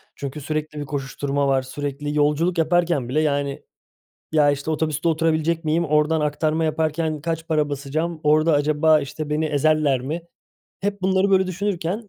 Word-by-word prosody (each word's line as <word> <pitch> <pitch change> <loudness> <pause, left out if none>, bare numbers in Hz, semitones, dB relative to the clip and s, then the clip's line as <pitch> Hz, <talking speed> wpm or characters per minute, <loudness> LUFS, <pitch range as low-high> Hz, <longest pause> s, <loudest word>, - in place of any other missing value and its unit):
Çünkü 140 +2 -6
sürekli 155 +1 -4
bir 145 - -4
koşuşturma 140 0 -2
var, 135 -1 +2
sürekli 145 +2 -5
yolculuk 155 +4 +2
yaparken 165 -5 +1
bile, 155 +4 +1
yani, 140 -2 -1 0.7
"Ya, 150 -2 +4
işte, 140 +3 -3
otobüste 155 +1 -1
oturabilecek 165 0 +1
miyim, 165 +2 +1
oradan 150 +1 +2
aktarma 155 +2 0
yaparken 155 -1 -1
kaç 165 0 -3
para 150 -2 +1
basacağım, 155 +4 -3
orada 155 +2 +4
acaba, 155 +2 +3
işte, 150 +2 -6
beni 155 +1 0
ezerler 150 -3 +2
mi?" 155 +6 -4 0.6
Hep 200 0 -3
bunları 190 +1 +2
böyle 190 -1 +4
düşünürken 190 +2 -3
155 Hz, 155 wpm, -22 LUFS, 145-165 Hz, 0.7 s, Ya